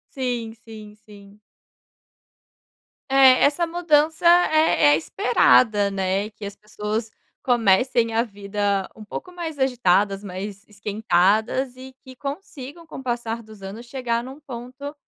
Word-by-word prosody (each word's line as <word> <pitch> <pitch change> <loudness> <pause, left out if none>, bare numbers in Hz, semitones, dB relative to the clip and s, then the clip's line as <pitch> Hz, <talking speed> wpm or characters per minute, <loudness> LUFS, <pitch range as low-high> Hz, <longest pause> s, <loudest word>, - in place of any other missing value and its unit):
Sim, 245 -4 -3
sim, 220 -2 -13
sim. 200 0 -16 1.7
É, 270 -1 +6
essa 300 +4 +2
mudança 320 -2 +1 0.2
é 315 - +3
é - - +4
esperada 205 - +3
né, 195 +1 -1
que 210 0 -10
as 200 0 -7
pessoas 210 +2 -4 0.3
comecem 235 0 +2
a 225 +1 +2
vida 200 -2 -2
um 220 - -11
pouco 360 - -8
mais 325 -4 -6
agitadas, 205 -6 +1
mais 200 +2 -7
esquentadas 215 +4 0
e 260 +1 -11
que 260 -1 -13
consigam 285 +2 -8
com - - -9
o - - -10
passar 235 -2 -3
dos 215 -2 -15
anos 200 +5 -8
chegar 240 -2 -2
num 265 +3 -10
ponto 260 +1 -8
230 Hz, 130 wpm, -23 LUFS, 205-265 Hz, 1.7 s, É